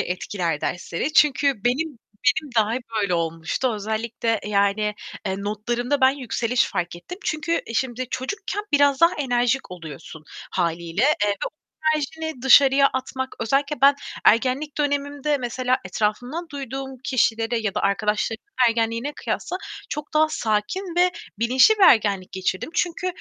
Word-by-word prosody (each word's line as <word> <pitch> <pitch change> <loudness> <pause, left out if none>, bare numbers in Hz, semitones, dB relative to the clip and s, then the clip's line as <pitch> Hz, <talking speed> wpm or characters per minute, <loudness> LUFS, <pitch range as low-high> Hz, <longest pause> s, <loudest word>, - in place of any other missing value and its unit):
etkiler 180 -3 -2
dersleri 180 - -3
çünkü 290 -2 +4
benim 270 +3 0 0.4
benim 305 -2 -4
dahi 220 +2 +2 0.2
böyle 200 -4 +1
olmuştu. 165 +9 -1
Özellikle, 220 +1 -2
yani, 210 +1 +1 0.3
eee, 190 - 0
notlarımda 240 +7 -2
ben 260 0 +6
yükseliş 255 -2 0
fark 175 0 -3
ettim. 355 - -9
Çünkü 310 +2 0
e, 230 - -7
şimdi 255 0 -2
çocukken 400 - -3
biraz 285 -1 +4
daha 335 +1 +5
enerjik 245 -4 0
oluyorsun 160 -2 -10 0.3
hâliyle. 170 +2 -1
Eee, 265 -7 +3
ve - - +1
o - - -5 0.4
enerjini 315 -2 -4
dışarıya 275 +1 +7
atmak 260 0 -4
Özellikle 275 +4 0
ben 280 +1 +7 0.3
ergenlik 265 +6 +2
dönemimde 285 0 0
mesela 255 0 0
etrafımdan 245 - -2
duyduğum 270 -1 -6
kişilere 230 -2 +1
ya 215 -3 -2
da - - 0
arkadaşlarımın 215 - -1 0.2
ergenliğine 230 +4 -1
kıyasla 360 - -3 0.3
çok 300 +1 -6
daha 310 +1 +5
sakin 310 - -2
ve 360 +1 +4 0.3
bilinçli 255 - +5
bir - - +2
ergenlik 205 - +4
geçirdim. 190 +7 -2
Çünkü 350 +1 -1
245 Hz, 135 wpm, -23 LUFS, 210-285 Hz, 0.4 s, dışarıya